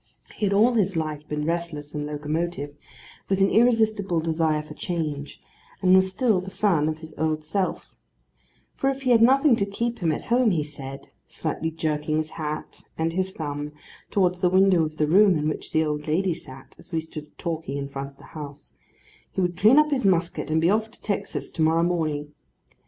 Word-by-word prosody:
He 210 - 0
had - - 0
all 225 +5 +5
his 200 -5 +1
life 155 -2 -3
been 150 0 -2
restless 165 -3 -3
and 150 -1 -3
locomotive, 150 0 -3 0.5
with 195 0 +1
an 195 0 +4
irresistible 220 -6 +3
desire 160 -1 0
for 150 - -10
change; 150 -4 -4 0.4
and 185 0 +5
was 190 0 +5
still 210 -1 +1
the 190 - -7
son 175 -7 +2
of 155 - -3
his 160 0 -10
old 155 -1 0
self: 185 +5 -2 0.8
for 270 - 0
if 270 0 -3
he 255 - +2
had 230 -2 +6
nothing 270 +2 +6
to 200 - +1
keep 235 +4 -2
him 165 -3 +1
at 155 - -3
home, 240 0 +3
he 165 -6 +1
said 135 -2 -8 0.2
(slightly 160 - -3
jerking 155 -1 -1
his 155 0 -2
hat 155 -1 -5 0.2
and 165 +1 0
his 190 +1 -1
thumb 145 -1 -4 0.4
towards 180 -3 +1
the 180 - +3
window 185 -2 +4
of 155 0 -4
the 150 - +2
room 190 +3 +5
in 150 0 -1
which 155 - -3
the 160 0 +2
old 150 0 -3
lady 175 +4 +1
sat, 130 -4 -11
as - - -16
we 165 - 0
stood 155 -2 -9
talking 160 -5 -3
in 140 0 -3
front 140 0 -6
of 140 - -23
the - - -17
house), 145 -2 -9 0.6
he - - -4
would 180 -1 +1
clean 215 +9 +5
up 300 0 +5
his 265 -3 +1
musket, 170 -5 +1
and 160 +1 +2
be 165 - +3
off 220 +1 +1
to - - -15
Texas 205 -2 -3
to - - -4
morrow 160 +1 +3
morning. 155 -4 -1
165 Hz, 205 wpm, -25 LUFS, 150-195 Hz, 0.8 s, had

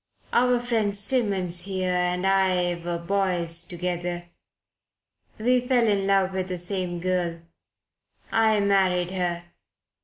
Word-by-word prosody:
Our 250 0 +3
friend 225 -4 0
Simmons 200 -6 0
here 185 -2 -1
and 180 +1 0
I 185 -2 +3
were 170 0 -2
boys 170 -2 -1
together. 175 0 -4 1.1
We 250 +3 +2
fell 245 -2 +2
in 200 -2 +1
love 195 -1 +2
with 185 -1 -2
the 180 -1 -4
same 180 -1 -3
girl. 175 -2 -1 0.9
I 220 -1 +3
married 185 -3 +2
her. 175 -2 -2
185 Hz, 120 wpm, -25 LUFS, 175-200 Hz, 1.1 s, Our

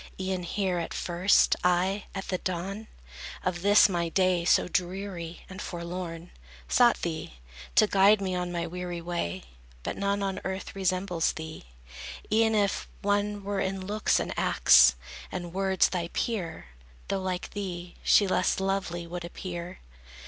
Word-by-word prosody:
E'en 185 -1 -2
here, 185 0 -1
at 165 - -4
first, 180 +3 +3
I, 185 +3 +1
at 195 - -5
the 185 - -1
dawn 195 +4 -4 0.6
Of 175 -1 -1
this, 205 +2 +6
my 170 -3 -1
day, 185 -1 +2
so - - +4
dreary 180 -2 -3
and 190 +1 -8
forlorn, 170 -1 -6 0.4
Sought 240 -1 +4
thee, 160 - -4 0.4
to - - +7
guide 200 +1 +5
me 190 -2 -2
on 180 -1 -2
my 170 -1 -2
weary 175 0 -5
way: 170 - -3 0.4
But - - -4
none 200 0 0
on 195 -1 -2
earth 190 +1 -5
resembles 185 -3 0
thee. 160 - -8 0.7
E'en 220 0 +3
if 200 -2 +1 0.2
One 205 0 0
were 200 0 -2
in 190 0 -2
looks 210 +2 +1
and - - -3
acts 65 +1 +6 0.4
and 175 -2 -5
words 190 0 +2
thy 175 -2 -2
peer, 170 - -3 0.4
Though 195 -1 -1
like 185 -1 -3
thee, 180 -3 -5
she 205 - +5
less 185 0 +1
lovely 190 -3 -2
would 175 +1 -6
appear. 175 0 -7
185 Hz, 150 wpm, -28 LUFS, 175-195 Hz, 0.7 s, to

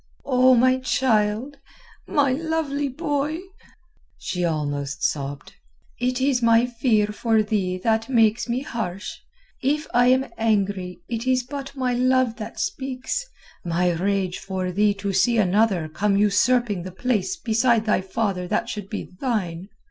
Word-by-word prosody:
"O 255 -1 +5
my 255 +2 +4
child, 245 0 0 0.5
my 280 -3 +2
lovely 295 -1 -1
boy," 290 +1 -2 0.8
she 180 -1 -3
almost 145 -3 -2
sobbed. 140 -1 -2 0.5
"It 250 +1 0
is 260 -2 +2
my 230 0 +5
fear 235 -3 +1
for 220 +1 +1
thee 195 -4 -1
that 225 +1 +1
makes 225 -2 +2
me 245 +2 0
harsh. 205 -8 -5 0.4
If 295 +4 0
I 245 +1 +5
am 260 +1 +4
angry 200 -5 0
it 235 +1 -4
is 255 -1 +2
but 275 +1 -7
my 255 -2 0
love 255 -1 +2
that 215 - -7
speaks, 270 - -3 0.4
my 175 +1 +1
rage 185 +1 -1
for 185 -1 -3
thee 205 +2 +2
to 200 0 -3
see 230 +5 +3
another 200 -4 +2
come 195 +6 0
usurping 210 0 +2
the 185 +2 -7
place 250 - -1
beside 230 -4 +2
thy 210 -3 +2
father 190 -2 -2
that - - -1
should 205 -2 -6
be 210 - -4 0.2
thine. 195 -8 -2
225 Hz, 145 wpm, -23 LUFS, 195-255 Hz, 0.8 s, O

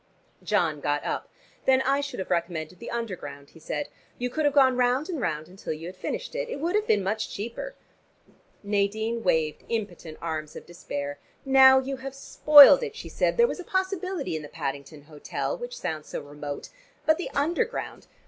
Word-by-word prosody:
John - - +1
got - - 0
up. - - -3 0.4
"Then 265 0 +4
I 275 +2 +2
should 280 -1 -5
have 190 - -5
recommended 170 -1 -2
the - - -7
Underground," 180 -12 -6
he 165 - -16
said. 285 - -4 0.3
"You 250 0 -3
could 310 +3 -1
have 290 - +3
gone 260 -2 +6
round 250 +6 +1
and 325 -7 -3
round 155 -6 -2
until 185 -2 -6
you 155 +2 -8
had 180 +2 -7
finished. - - -5
It - - -3
would 335 +5 -1
have 425 +1 +1
been 205 -2 +3
much 215 +3 -2
cheaper." 235 - -6 0.9
Nadine 215 +3 0
waved 160 -4 +1
impotent 180 -8 -4
arms 155 -2 -4
of - - -9
despair. 145 -4 -6 0.3
"Now 265 0 +8
you 265 +1 -1
have 270 +1 -7
spoiled 290 - +8
it," 450 -2 -4
she - - -8
said. - - 0
"There 470 - +6
was 475 - -3
a - - -5
possibility 375 - -2
in 155 - -3
the 150 - -9
Paddington 140 -1 -5
hotel, 150 - -4
which - - -7
sounds 155 -1 -4
so - - -4
remote. 145 0 -7 0.4
But 315 +2 +3
the 360 - -3
Underground! 345 +12 -1
230 Hz, 185 wpm, -26 LUFS, -, 0.9 s, Now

